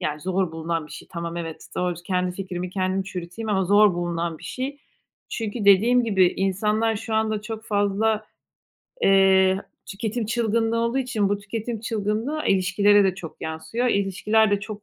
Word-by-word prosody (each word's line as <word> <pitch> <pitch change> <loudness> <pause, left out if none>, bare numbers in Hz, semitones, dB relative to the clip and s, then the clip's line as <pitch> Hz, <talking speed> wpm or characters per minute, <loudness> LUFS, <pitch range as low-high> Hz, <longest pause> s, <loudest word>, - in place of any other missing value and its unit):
yani, 150 0 -3
zor 185 -1 -1
bulunan 165 -1 -3
bir - - -13
şey. - - -10
Tamam, 170 0 -4
evet, 165 -2 -6
doğru. 180 -1 0
Kendi 180 -1 -1
fikrimi 180 -2 -4
kendim 185 0 -1
çürüteyim 185 +3 -6
ama 190 -2 +1
zor 205 0 +5
bulunan 170 -2 -2
bir - - -13
şey. 275 +3 -4 0.5
Çünkü 220 -1 -4
dediğim 230 +5 +5
gibi 190 -5 +4
insanlar 210 +3 +1
şu 220 +1 -4
anda 220 -1 0
çok 220 0 -6
fazla, 210 +1 0 0.8
eee, 190 0 +4 0.2
tüketim 220 +2 -3
çılgınlığı 230 0 0
olduğu 235 +3 0
için 245 -6 0
bu 205 - 0
tüketim 220 +2 -5
çılgınlığı 225 +7 -2
ilişkilere 200 +2 +4
de 190 -2 +2
çok 175 -4 -10
yansıyor. 160 +10 -3
İlişkiler 205 +1 +2
de 205 0 +1
çok 210 -1 -7
200 Hz, 160 wpm, -24 LUFS, 185-220 Hz, 0.8 s, zor